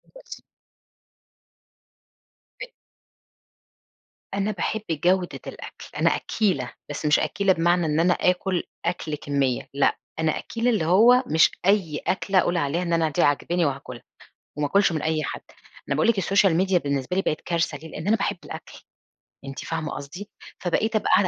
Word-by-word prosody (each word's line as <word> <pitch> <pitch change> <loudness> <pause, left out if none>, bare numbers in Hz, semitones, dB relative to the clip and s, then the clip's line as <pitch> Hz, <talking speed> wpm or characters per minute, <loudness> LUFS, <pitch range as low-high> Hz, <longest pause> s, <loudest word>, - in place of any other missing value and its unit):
بصي - - -11 2.2
أ - - -5 1.7
أنا 200 +2 0
باحب 215 +2 -2
جودة 175 +3 +1
الأكل، - - -9
أنا - - +3
أكّيلة، 180 - -1 0.2
بس 145 +1 -5
مش 150 0 +4
أكّيلة 195 -1 +1
بمعنى 175 0 +2
إن 155 0 +1
أنا 175 +2 +4
آكل 180 0 0 0.2
أكل 170 -3 -2
كمية، 140 -3 -1
لأ، 140 - +2 0.2
أنا 160 -1 +1
أكّيلة 230 +1 -2
اللي 215 -9 +1
هو 230 +9 +6
مش 160 -5 +4
أي 190 -6 +2
أكلة 195 0 +2
أقول 175 0 +1
عليها 165 +2 0
إن 170 -1 -1
أنا 165 -1 +2
دي 145 - 0
عاجباني 170 +4 +1
وهاكلها، 135 -4 -4 0.5
وما 150 - 0
آكلش 195 +3 +3
من 155 -2 -2
أي 155 -1 0
حد، - - -4 0.5
أنا 140 - 0
باقول 155 - +2
لِك 220 -4 +3
الSocial 195 -1 +3
Media 190 -1 +2
بالنسبة 140 +4 -2
لي 195 - +2
بقت 155 - -1
كارثة 165 -3 -1
ليه؟ 160 +3 -11
لأن 160 +3 -7
أنا 220 - +4
باحب 200 - -1
الأكل، - - -9 0.7
أنتِ 135 -1 -7
فاهمة 160 -2 -3
قصدي، 175 +9 -8 0.3
فبقيت 215 +5 0
أبقى 215 - +1
قاعدة 195 +1 +5
170 Hz, 160 wpm, -24 LUFS, 150-195 Hz, 2.2 s, هو